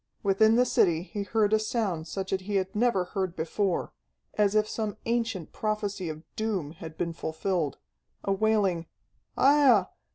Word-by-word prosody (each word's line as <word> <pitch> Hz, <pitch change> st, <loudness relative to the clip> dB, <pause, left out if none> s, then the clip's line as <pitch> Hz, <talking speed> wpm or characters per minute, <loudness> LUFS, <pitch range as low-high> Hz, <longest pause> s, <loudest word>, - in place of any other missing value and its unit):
Within 220 Hz, +3 st, +4 dB
the 250 Hz, +1 st, +4 dB
city 170 Hz, -8 st, +2 dB
he 205 Hz, +2 st, -5 dB
heard 210 Hz, +1 st, +1 dB
a 220 Hz, -, +5 dB
sound 210 Hz, -7 st, -2 dB
such 190 Hz, +2 st, -4 dB
as 190 Hz, -, +1 dB
he 205 Hz, +2 st, -4 dB
had 190 Hz, 0 st, -1 dB
never 220 Hz, -4 st, +2 dB
heard 185 Hz, -1 st, -3 dB
before, 175 Hz, +3 st, -1 dB, 0.4 s
as 210 Hz, -1 st, +2 dB
if 215 Hz, 0 st, +3 dB
some 215 Hz, -2 st, -3 dB
ancient 230 Hz, -7 st, -1 dB
prophecy 205 Hz, -4 st, -2 dB
of 155 Hz, 0 st, -7 dB
doom 200 Hz, -9 st, -2 dB
had 160 Hz, -1 st, -10 dB
been 170 Hz, -1 st, -2 dB
fulfilled, 160 Hz, -1 st, -2 dB, 0.5 s
a 195 Hz, -, -1 dB
wailing 195 Hz, -5 st, +1 dB, 0.5 s
"Aiah! 265 Hz, -9 st, +5 dB
195 Hz, 160 wpm, -28 LUFS, 175-220 Hz, 0.5 s, a